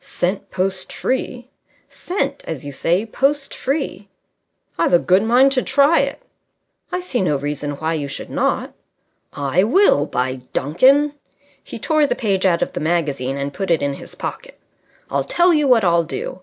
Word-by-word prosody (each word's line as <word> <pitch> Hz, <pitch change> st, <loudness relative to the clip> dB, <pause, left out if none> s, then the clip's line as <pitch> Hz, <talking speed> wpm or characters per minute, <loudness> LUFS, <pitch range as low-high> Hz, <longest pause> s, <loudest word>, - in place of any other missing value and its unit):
"Sent 185 Hz, +3 st, -3 dB
post 185 Hz, 0 st, -2 dB
free." 255 Hz, -1 st, -3 dB, 0.4 s
"Sent, 400 Hz, +6 st, -3 dB
as 160 Hz, -, -5 dB
you 145 Hz, -, -5 dB
say, 170 Hz, +9 st, 0 dB
post 275 Hz, +5 st, -1 dB
free." 270 Hz, -8 st, -3 dB, 0.7 s
"I've 170 Hz, -, +2 dB
a -, -, +8 dB
good 185 Hz, +3 st, +3 dB
mind 245 Hz, +5 st, +4 dB
to 260 Hz, -2 st, +1 dB
try 280 Hz, +5 st, +3 dB
it." -, -, -1 dB, 0.7 s
"I 360 Hz, -, -2 dB
see 275 Hz, -, -2 dB
no 175 Hz, -6 st, +1 dB
reason 145 Hz, +1 st, -3 dB
why 160 Hz, +3 st, -2 dB
you 150 Hz, -3 st, -3 dB
should 135 Hz, -, -7 dB
not." -, -, -1 dB, 0.6 s
"I 145 Hz, +6 st, 0 dB
will, 225 Hz, -, +4 dB
by 130 Hz, +1 st, -2 dB, 0.2 s
Duncan!" 270 Hz, -, +3 dB, 0.5 s
He -, -, -8 dB
tore 310 Hz, -2 st, +2 dB
the -, -, 0 dB
page 195 Hz, -5 st, +1 dB
out 170 Hz, -2 st, +2 dB
of -, -, -6 dB
the -, -, -3 dB
magazine 145 Hz, -5 st, -1 dB
and 140 Hz, 0 st, -4 dB
put 195 Hz, -2 st, -4 dB
it 165 Hz, -3 st, +2 dB
in 140 Hz, 0 st, 0 dB
his -, -, -10 dB
pocket. -, -, -7 dB, 0.5 s
"I'll -, -, 0 dB
tell 350 Hz, 0 st, +3 dB
you 300 Hz, -2 st, +2 dB
what 240 Hz, -4 st, +4 dB
I'll 170 Hz, -2 st, +3 dB
do. 170 Hz, +2 st, -6 dB
190 Hz, 175 wpm, -20 LUFS, -, 0.7 s, a